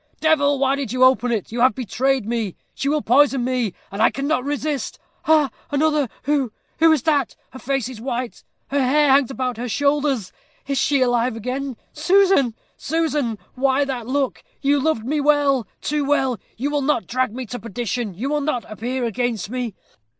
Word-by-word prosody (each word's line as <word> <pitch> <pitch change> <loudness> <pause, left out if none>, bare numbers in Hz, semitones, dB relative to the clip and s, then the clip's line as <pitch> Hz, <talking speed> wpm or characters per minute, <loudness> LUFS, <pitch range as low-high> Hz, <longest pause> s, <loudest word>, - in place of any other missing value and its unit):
Devil! 285 -3 +3
why 270 0 +2
did 275 -6 -4
you 255 +1 +2
open 250 -2 +4
it? 220 -4 -2
you 235 - -4
have 255 +1 +5
betrayed 260 +1 0
me 225 -4 -2 0.2
she 275 - -2
will 300 0 0
poison 265 0 +4
me 250 -5 0 0.2
and 200 +2 -3
I - - +6
cannot 275 -1 -1
resist. 290 0 -2 0.3
Ha! 310 -3 +4 0.2
another! 300 -1 +2 0.2
Who 275 -4 +1 0.3
who 325 0 +6
is 310 -6 +2
that? 290 -6 +1 0.2
her 260 - -10
face 270 -3 -1
is 250 -4 -9
white 245 -1 -4 0.3
her 280 0 +1
hair 290 +3 +3
hangs 270 -2 +4
about 255 -3 -3
her 245 +1 -4
shoulders. 280 -5 0 0.3
Is 275 -1 -1
she 280 -2 +2
alive 245 -1 +1
again? 255 +3 -4 0.2
Susan! 355 - +3 0.2
Susan! 300 -7 -1 0.2
why 270 +2 +2
that 250 -4 -4
look? 270 0 -1 0.2
You 285 0 +2
loved 270 -6 0
me 295 +3 0
well 285 -4 +3
too 300 0 -1
well. 270 -4 +1 0.2
You 280 +5 -1
will 290 -1 0
not 275 -4 +1
drag 255 -1 0
me 255 0 -4
to 245 +2 -6
perdition! 230 -1 -3
You 235 +9 -3
will 300 0 +1
not 275 -5 -1
appear 240 +4 -3
against 230 -3 -2
me! 245 -5 -3
265 Hz, 185 wpm, -21 LUFS, 245-285 Hz, 0.3 s, I